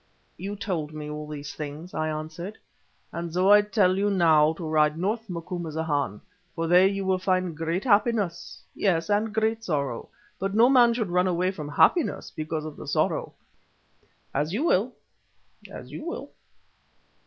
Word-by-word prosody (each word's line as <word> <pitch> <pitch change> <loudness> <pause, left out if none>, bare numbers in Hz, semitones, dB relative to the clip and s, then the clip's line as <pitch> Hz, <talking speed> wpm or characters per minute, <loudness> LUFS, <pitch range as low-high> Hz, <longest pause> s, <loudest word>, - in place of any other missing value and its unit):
"You 200 +3 -5
told 165 -7 -3
me 150 0 -6
all 150 0 -6
these 150 -1 -7
things," 150 +4 -7
I 155 0 -1
answered. 160 +6 -6 0.5
"And 170 0 -5
so 185 +4 +3
I 210 0 +8
tell 200 -3 +2
you 205 +1 +2
now 160 -5 +4
to 165 -1 -6
ride 155 0 +2
north, 215 +5 -2
Macumazahn, 160 - -3 0.3
for 165 -1 -1
there 180 +3 +6
you 195 0 -2
will 190 -1 +1
find 185 -2 0
great 165 +4 -2
happiness—yes, 205 -5 0
and 210 +2 +1
great 220 +1 0
sorrow. 140 - -2 0.3
But 195 +1 -2
no 235 +3 +6
man 240 -3 +5
should 220 -7 -2
run 180 +1 +3
away 180 +1 +1
from 150 -6 -7
happiness 310 - +2
because 155 0 -3
of 155 -2 -8
the - - -9
sorrow. - - 0 1.0
As 150 +5 -1
you 240 +9 0
will, 245 - +2 0.8
as - - -9
you - - -7
will!" 340 - -6
180 Hz, 160 wpm, -26 LUFS, 155-205 Hz, 1.0 s, I